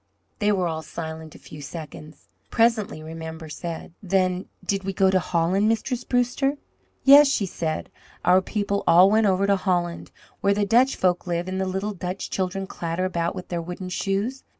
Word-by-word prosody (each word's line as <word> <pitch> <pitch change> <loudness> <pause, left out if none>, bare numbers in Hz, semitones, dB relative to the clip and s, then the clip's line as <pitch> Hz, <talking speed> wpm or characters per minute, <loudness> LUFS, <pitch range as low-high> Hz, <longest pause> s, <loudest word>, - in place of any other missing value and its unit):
They 210 0 +2
were 185 -3 +1
all 160 -1 -3
silent 160 0 -7
a - - -10
few 150 - -11
seconds. 155 +1 -9 0.2
Presently 225 -8 +1
Remember 160 0 -7
said: 165 +1 -6
"Then 185 -1 0 0.2
did 195 -1 -1
ye 195 0 -3
go 190 0 +3
to 190 - +3
Holland, 180 +5 +1
Mistress 240 +2 -1
Brewster?" 250 +3 +1 0.5
"Yes," 285 +2 +9
she 245 -7 +1
said. 160 -3 -4 0.3
"Our 180 +2 +5
people 200 0 -2
all 180 +4 +7
went 220 0 +4
over 190 0 +2
to 200 0 +3
Holland, 175 -3 -1 0.3
where 200 0 +2
the 205 0 +1
Dutch 245 +6 +4
folk 180 -1 0
live 175 +1 -1
and 190 0 -2
the 190 - -1
little 190 +3 -2
Dutch 180 +1 -5
children 190 +1 -2
clatter 170 0 -3
about 170 -2 -1
with 180 - -8
their 175 -1 -2
wooden 180 +2 -6
shoes. 200 +8 -2
185 Hz, 180 wpm, -24 LUFS, 170-205 Hz, 0.5 s, Yes